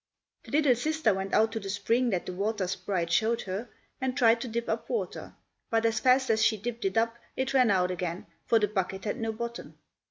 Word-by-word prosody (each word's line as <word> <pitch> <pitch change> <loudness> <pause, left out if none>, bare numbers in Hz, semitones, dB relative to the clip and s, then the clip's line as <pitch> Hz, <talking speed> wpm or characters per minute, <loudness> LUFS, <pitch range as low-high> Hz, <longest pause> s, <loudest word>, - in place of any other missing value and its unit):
The - - -11
little 295 -3 +5
sister 300 -1 +1
went 195 +1 -3
out 220 +1 +4
to 225 - -3
the 195 -2 -7
spring 230 +5 +1
that 185 -5 -1
the 185 - -5
water 200 +1 -1
sprite 180 -2 -2
showed 230 +4 +2
her, 200 +5 -5 0.3
and 260 0 -1
tried 230 -1 +4
to 250 - -4
dip 235 +1 -3
up - - -3
water, 470 - -4 0.3
but 225 0 +1
as 225 -1 +2
fast 255 +1 +4
as 220 0 +2
she 220 - +3
dipped 235 +2 -5
it 195 +3 0
up 230 +1 +1 0.2
it 260 +1 -1
ran 255 -3 +5
out 185 -2 +2
again, 180 -1 -4 0.2
for 230 - +5
the 210 -2 +2
bucket 190 -1 -3
had 210 - -2
no 225 -1 -1
bottom. 235 +1 -6
225 Hz, 225 wpm, -28 LUFS, 195-235 Hz, 0.3 s, little